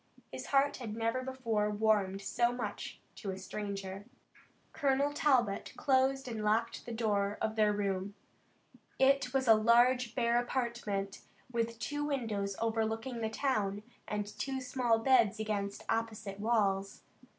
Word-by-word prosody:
His - - -6
heart 280 0 +3
had 225 -5 -6
never 230 +3 0
before 235 -5 -1
warmed 205 -2 +1
so 240 +4 +1
much 230 -5 -5 0.2
to 200 - -5
a 190 - -3
stranger. 195 0 -5 0.7
Colonel 280 -1 +1
Talbot 255 -9 +1
closed 270 -1 +2
and 225 -3 -4
locked 225 +3 0
the - - -4
door 205 -3 0
of 220 0 -1
their 215 -1 +4
room. 200 -1 -2 0.8
It 270 -1 +3
was 265 -1 0
a 225 - +9
large 235 +2 +4
bare 235 -1 +3
apartment 235 -6 -2 0.3
with 230 -1 -1
two 290 +7 -3
windows 220 -9 -2
overlooking 225 +2 -1
the 220 - 0
town, 210 -5 -1 0.2
and 210 -1 -2
two 265 +6 -4
small 250 -3 +1
beds 225 -3 +3
against 205 -2 -2
opposite 220 -3 -2
walls. 200 -3 0
225 Hz, 140 wpm, -33 LUFS, 205-250 Hz, 0.8 s, a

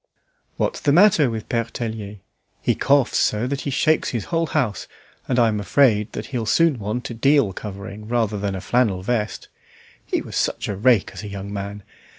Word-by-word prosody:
"What's - - -1
the 145 - +1
matter 170 -4 +5
with 110 -2 -5
Pere 115 -1 0
Tellier? 110 -3 -5 0.4
He - - +1
coughs 140 -3 +2
so 105 +3 +1
that 140 +2 -2
he - - -3
shakes 155 +3 +2
his 115 -4 -3
whole 165 0 +1
house, 125 -12 -1 0.4
and 125 - 0
I'm 110 -3 +3
afraid 105 0 +3
he'll 120 -5 -4
soon 160 +1 +3
want 110 +5 -4
a - - -4
deal 135 -3 +3
covering 100 +1 -8
rather 110 -3 0
than 100 -1 -2
a 95 - -5
flannel 110 -7 +1
vest. 110 -1 -2 0.6
He - - -1
was - - -8
such - - -1
a 100 - -2
rake 110 +1 +3
as 95 - -7
a 105 - -7
young 100 0 -6
man! 100 0 -5
110 Hz, 185 wpm, -22 LUFS, 100-130 Hz, 0.6 s, matter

